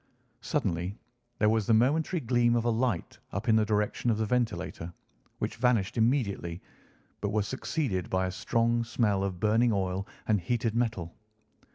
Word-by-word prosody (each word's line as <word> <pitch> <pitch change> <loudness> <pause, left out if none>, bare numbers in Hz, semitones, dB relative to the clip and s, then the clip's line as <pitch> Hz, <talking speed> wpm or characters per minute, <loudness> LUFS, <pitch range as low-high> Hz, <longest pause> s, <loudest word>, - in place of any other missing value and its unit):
Suddenly 90 +5 -1 0.4
there 105 - +3
was 110 -2 +1
the 115 - +5
momentary 155 +9 +2
gleam 120 0 +2
of 120 0 0
a - - +3
light 115 -6 -1
up 100 +5 -3
in 110 - +5
the 110 - +4
direction 105 +3 0
of 110 - +2
the 110 - 0
ventilator, 105 -7 -2 0.5
which - - -3
vanished 120 -5 +2
immediately, 110 -8 0 0.6
but 105 - -1
was 105 -1 0
succeeded 130 - -2
by 95 0 +1
a 90 - -2
strong 115 +4 +1
smell 105 -4 +1
of 95 -3 -3
burning 110 +4 +3
oil 95 -1 -1 0.2
and 105 -3 +2
heated 115 +3 0
metal. 110 -8 -1
110 Hz, 165 wpm, -29 LUFS, 95-120 Hz, 0.6 s, the